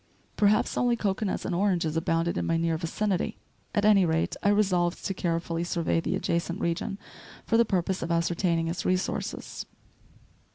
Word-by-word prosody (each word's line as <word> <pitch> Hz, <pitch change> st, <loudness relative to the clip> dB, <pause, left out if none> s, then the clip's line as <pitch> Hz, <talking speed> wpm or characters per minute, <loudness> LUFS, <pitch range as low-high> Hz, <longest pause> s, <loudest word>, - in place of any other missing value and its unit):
Perhaps 210 Hz, +1 st, +2 dB
only 245 Hz, -1 st, +3 dB
cocoanuts 200 Hz, -2 st, -1 dB
and -, -, -2 dB
oranges 175 Hz, -4 st, +1 dB
abounded 165 Hz, +1 st, 0 dB
in -, -, -1 dB
my 165 Hz, -, +2 dB
near 165 Hz, 0 st, +1 dB
vicinity; 180 Hz, +4 st, -1 dB, 0.4 s
at 205 Hz, -, +2 dB
any 205 Hz, -2 st, +6 dB
rate, 165 Hz, -1 st, 0 dB
I 200 Hz, -, +3 dB
resolved 185 Hz, -4 st, +1 dB
to 195 Hz, -, -1 dB
carefully 170 Hz, -1 st, -2 dB
survey 170 Hz, -1 st, 0 dB
the -, -, -1 dB
adjacent 170 Hz, +2 st, -1 dB
region 170 Hz, +3 st, -2 dB, 0.5 s
for 225 Hz, -, +1 dB
the 230 Hz, +1 st, +5 dB
purpose 190 Hz, -1 st, -1 dB
of -, -, -3 dB
ascertaining 170 Hz, 0 st, +1 dB
its 170 Hz, +2 st, -3 dB
resources. 185 Hz, +1 st, -2 dB
175 Hz, 160 wpm, -27 LUFS, 165-200 Hz, 0.5 s, any